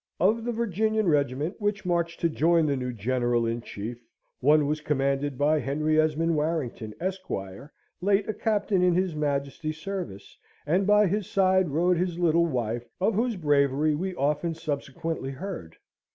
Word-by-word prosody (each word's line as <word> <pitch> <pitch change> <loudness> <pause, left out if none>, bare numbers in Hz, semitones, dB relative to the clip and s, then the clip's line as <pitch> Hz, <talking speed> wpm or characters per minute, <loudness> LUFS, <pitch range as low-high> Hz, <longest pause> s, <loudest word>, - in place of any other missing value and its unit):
Of 220 +6 +2
the 240 - 0
Virginian 220 -1 0
regiment 145 - 0
which 205 -1 -1
marched 170 -1 0
to 170 - +3
join 165 +1 +3
the 145 -2 +1
new 125 -1 -3
General 120 +1 0
in 115 +1 -2
Chief, 115 +2 -7 0.4
one 150 +3 +4
was 150 +1 -1
commanded 140 -1 0
by 150 +3 +3
Henry 155 +3 +1
Esmond 160 +1 +1
Warrington, 150 -8 -2
Esq., 185 +1 -4 0.7
late 200 +1 +2
a 215 - -1
Captain 210 -3 0
in 180 -1 +3
his 185 -1 +1
Majesty's 150 +1 -2
service; 175 - -6 0.3
and 180 +6 +1
by 210 0 +5
his 200 +1 -1
side 190 -3 +3
rode 175 +5 +2
his 175 -1 -1
little 170 -1 +3
wife, 120 -4 -2
of 200 +4 +2
whose 230 +3 0
bravery 145 -2 +2
we 185 +5 -3
often 150 +3 0
subsequently 145 0 -4
heard. 135 - -7
160 Hz, 160 wpm, -27 LUFS, 140-185 Hz, 0.7 s, by